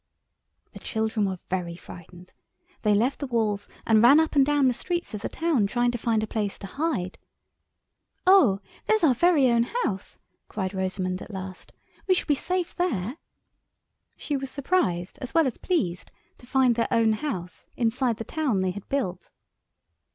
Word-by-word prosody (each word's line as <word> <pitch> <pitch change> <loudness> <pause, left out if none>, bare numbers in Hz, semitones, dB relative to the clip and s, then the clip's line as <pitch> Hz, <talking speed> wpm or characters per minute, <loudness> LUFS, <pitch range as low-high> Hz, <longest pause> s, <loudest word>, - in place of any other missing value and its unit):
The - - -10
children 220 -2 -1
were 190 -1 -3
very 175 -2 -3
frightened. 180 +1 -13 0.5
They 210 -2 +3
left 245 +6 +1
the 280 - -3
walls 215 -4 -1 0.2
and 220 -1 +5
ran 265 +6 +8
up 320 -1 0
and 280 - +6
down 290 -1 +3
the 250 - +3
streets 345 +4 -3
of 210 - -5
the - - -3
town 310 -11 +1
trying 240 +3 +1
to 240 - -3
find 225 -1 +1
a - - 0
place 210 -2 -3
to - - -9
hide. 230 - -2 1.1
"Oh, 280 - +5 0.3
there's 435 -4 +2
our 290 -5 +6
very 305 0 +4
own 235 0 +4 0.2
house," 195 -2 -3 0.3
cried 190 -2 -3
Rosamund 185 -1 -2
at - - -9
last; 190 -2 -8 0.4
"we 370 - +5
shall - - 0
be 295 - +3
safe 360 +5 -2
there." 255 - -1 1.0
She 295 - -3
was 270 -1 -3
surprised 255 - -1
as 255 - -7
well 325 -1 +5
as 255 - -3
pleased 185 - -1 0.3
to 245 - -16
find 260 -1 +3
their 230 0 0
own 225 -1 +3
house 200 - -5
inside 240 0 +1
the 225 - -4
town 270 -9 -1
they 185 -1 0
had 200 +1 -9
built. 190 -10 -2
230 Hz, 175 wpm, -26 LUFS, 195-280 Hz, 1.1 s, ran